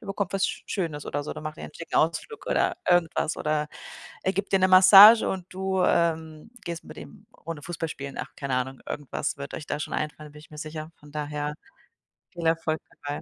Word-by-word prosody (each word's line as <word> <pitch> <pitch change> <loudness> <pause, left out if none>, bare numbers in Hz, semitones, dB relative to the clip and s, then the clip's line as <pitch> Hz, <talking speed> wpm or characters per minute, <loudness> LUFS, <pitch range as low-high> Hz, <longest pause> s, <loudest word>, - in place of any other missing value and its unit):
der 215 - -13
bekommt 195 -1 -3
was 195 -1 +2
Sch - - -5
Schönes 160 -7 -3
oder 145 0 -3
so, - - -4
dann - - -8
macht 155 0 -6
ihr - - -7
'n - - -11
schicken 165 - -5
Ausflug 165 - 0
oder - - +1
irgendwas 170 -3 +2
oder 150 0 -1 0.6
er 190 - +1
gibt 200 0 -3
dir 195 - +5
ne 185 - +4
Massage 195 +4 +9
und 185 -2 -4
du, 190 0 -1
ähm, 160 +3 0
gehst 170 -1 -5
mit - - -12
ihm 75 -3 -12
'ne - - -24
runde 165 -3 -5
Fußball 165 -1 -4
spielen. 140 -2 -7
Ach, - - -3
keine 135 -2 -2
Ahnung, 130 +1 -3
irgendwas 145 -1 -3
wird 140 0 -7
euch 150 - -6
da 150 - -2
schon - - -5
einfallen, 150 0 -4
da - - -17
bin 150 - -12
ich 155 - -17
mir 150 - -11
sicher. 155 +1 -7
Von 145 0 -16
daher, 150 0 -3 0.8
viel 170 -2 -6
Erfolg 160 -1 +1
dabei. 145 0 -6
160 Hz, 225 wpm, -26 LUFS, 150-185 Hz, 0.8 s, Massage